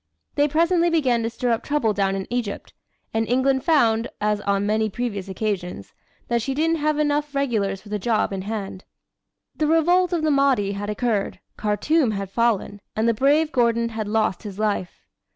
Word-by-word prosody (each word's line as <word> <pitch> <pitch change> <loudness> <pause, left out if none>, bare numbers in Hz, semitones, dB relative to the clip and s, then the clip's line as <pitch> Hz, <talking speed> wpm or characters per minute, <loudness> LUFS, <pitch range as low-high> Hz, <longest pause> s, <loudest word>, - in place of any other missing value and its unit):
They 290 0 +2
presently 335 +3 +2
began 265 -8 +2
to 225 - -1
stir 240 +1 -2
up 230 - +1
trouble 285 -8 0
down 195 -1 0
in 190 -1 -3
Egypt, 235 -5 -4 0.4
and 225 0 0
England 260 +1 +2
found, 235 -8 +3
as 210 0 0
on 200 0 0
many 215 +1 +1
previous 205 -3 -4
occasions, 190 - -4 0.3
that 235 -1 +1
she 265 +4 -2
didn't 325 +3 +1
have 305 0 +1
half 300 - 0
enough 295 0 -1
regulars 210 -8 0
for 210 - -14
the 210 0 -2
job 215 0 0
in 190 - -3
hand. 195 -2 -5 0.7
The 305 - 0
revolt 350 +3 +3
of 340 -3 0
the 310 - +2
Mahdi 275 -8 +2
had 205 +1 -4
occurred, 210 -2 -1 0.2
Khartoum 225 +5 +1
had 195 -1 -4
fallen, 215 -3 0
and 220 +1 +1
the 230 - +4
brave 295 +6 +2
Gordon 235 -2 +2
had 220 -2 -4
lost 215 -3 0
his 205 -3 -8
life. 205 -4 -2
230 Hz, 190 wpm, -23 LUFS, 205-285 Hz, 0.7 s, the